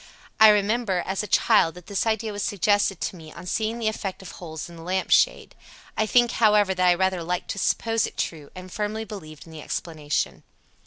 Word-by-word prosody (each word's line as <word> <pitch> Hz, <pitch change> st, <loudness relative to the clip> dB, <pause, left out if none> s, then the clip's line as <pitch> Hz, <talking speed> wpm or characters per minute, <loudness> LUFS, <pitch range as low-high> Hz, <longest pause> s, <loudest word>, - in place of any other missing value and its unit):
"I 220 Hz, 0 st, +9 dB
remember, 210 Hz, -2 st, +1 dB
as 190 Hz, +1 st, -2 dB
a 210 Hz, -, -5 dB
child, 165 Hz, -3 st, +3 dB
that 180 Hz, -1 st, -12 dB
this 200 Hz, +2 st, -2 dB
idea 220 Hz, 0 st, 0 dB
was 205 Hz, 0 st, -5 dB
suggested 205 Hz, -1 st, +1 dB
to -, -, -3 dB
me 160 Hz, -3 st, -12 dB
on 170 Hz, -, -11 dB
seeing 220 Hz, +4 st, -1 dB
the 230 Hz, -2 st, -2 dB
effect 195 Hz, -3 st, -4 dB
of 190 Hz, -, -9 dB
holes 160 Hz, -3 st, -8 dB
in 170 Hz, -, -12 dB
the -, -, -10 dB
lamp 185 Hz, +3 st, -2 dB
shade. -, -, +3 dB, 0.4 s
I 215 Hz, -, 0 dB
think, 240 Hz, +2 st, +4 dB
however, 210 Hz, -3 st, +3 dB
that 185 Hz, -1 st, +2 dB
I 175 Hz, -, +5 dB
rather 190 Hz, 0 st, 0 dB
liked 180 Hz, +2 st, -3 dB
to 200 Hz, -, -5 dB
suppose 225 Hz, +2 st, +1 dB
it -, -, -12 dB
true 150 Hz, -4 st, -4 dB
and 185 Hz, 0 st, -10 dB
firmly 215 Hz, +2 st, -3 dB
believed 155 Hz, -8 st, -10 dB
in 165 Hz, -, -14 dB
the 155 Hz, -1 st, -9 dB
explanation." 150 Hz, -6 st, -3 dB
190 Hz, 215 wpm, -24 LUFS, 175-215 Hz, 0.4 s, I